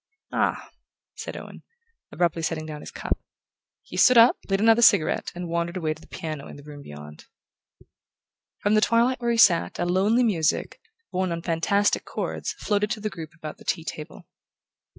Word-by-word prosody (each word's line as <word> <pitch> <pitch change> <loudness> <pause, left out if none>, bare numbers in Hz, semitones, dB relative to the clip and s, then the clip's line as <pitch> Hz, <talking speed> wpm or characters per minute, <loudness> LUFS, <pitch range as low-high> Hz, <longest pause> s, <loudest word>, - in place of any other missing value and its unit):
"Ah," - - -1 0.4
said - - -7
Owen, - - -10 0.5
abruptly 170 +1 0
setting 160 -1 -2
down 150 -1 -7
his - - -9
cup. - - -3 0.6
He - - -9
stood 255 -1 +6
up, 230 +1 +8
lit 195 0 +1
another 225 +2 +5
cigarette, 200 -8 +4
and 175 0 -5
wandered 170 +1 -2
away 160 -3 -1
to 155 - -18
the - - -17
piano 155 -3 -6
in - - -10
the 145 - -13
room 145 -1 -10
beyond. 75 - -11 1.3
From 205 - 0
the 215 - +4
twilight 240 +3 +2
where 240 - 0
he 235 - +1
sat 190 -8 +4
a 175 - -1
lonely 200 +7 +2
music, 175 -9 0 0.3
borne 185 -1 -1
on 170 0 -4
fantastic 180 +5 +1
chords, - - -4
floated 210 0 -1
to 225 0 -3
the 215 0 -3
group 165 -3 -9
about 155 -2 -8
the - - -14
tea 165 - -1
table. 155 -1 -8
175 Hz, 180 wpm, -25 LUFS, 155-215 Hz, 1.3 s, up